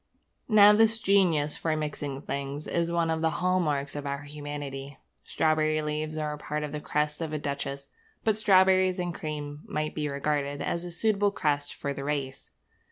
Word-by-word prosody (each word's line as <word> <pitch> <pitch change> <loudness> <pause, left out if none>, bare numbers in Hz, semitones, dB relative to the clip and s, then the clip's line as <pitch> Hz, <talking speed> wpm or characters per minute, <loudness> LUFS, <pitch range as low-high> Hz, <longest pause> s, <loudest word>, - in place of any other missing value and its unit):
Now 210 -1 +8
this 225 +1 +4
genius 180 -8 +2
for 160 -1 -1
mixing 145 -2 -4
things 140 +1 -4
is 170 0 -1
one 170 -1 +1
of 160 0 -1
the 160 - +3
hall 185 +1 +2
marks 145 -4 -1
of 145 -1 -4
our 140 +1 -3
humanity. 145 -2 -6 0.3
Strawberry 155 -1 +1
leaves 155 +1 -3
are 150 -1 -2
part 150 0 -3
of 150 - -4
the 150 0 -4
crest 150 +1 -1
of 160 -2 -3
a - - 0
duchess; 140 -1 -4 0.3
but 220 -2 +3
strawberries 190 -3 +4
and 175 -1 -2
cream 150 -2 -5
might 155 0 -2
be 150 -1 -2
regarded 145 0 -1
as 170 +1 -2
a - - -5
suitable 205 +3 +2
crest 145 -6 -1
for 140 - -3
the 140 - -6
race. 140 -2 -3
150 Hz, 180 wpm, -28 LUFS, 145-170 Hz, 0.3 s, Now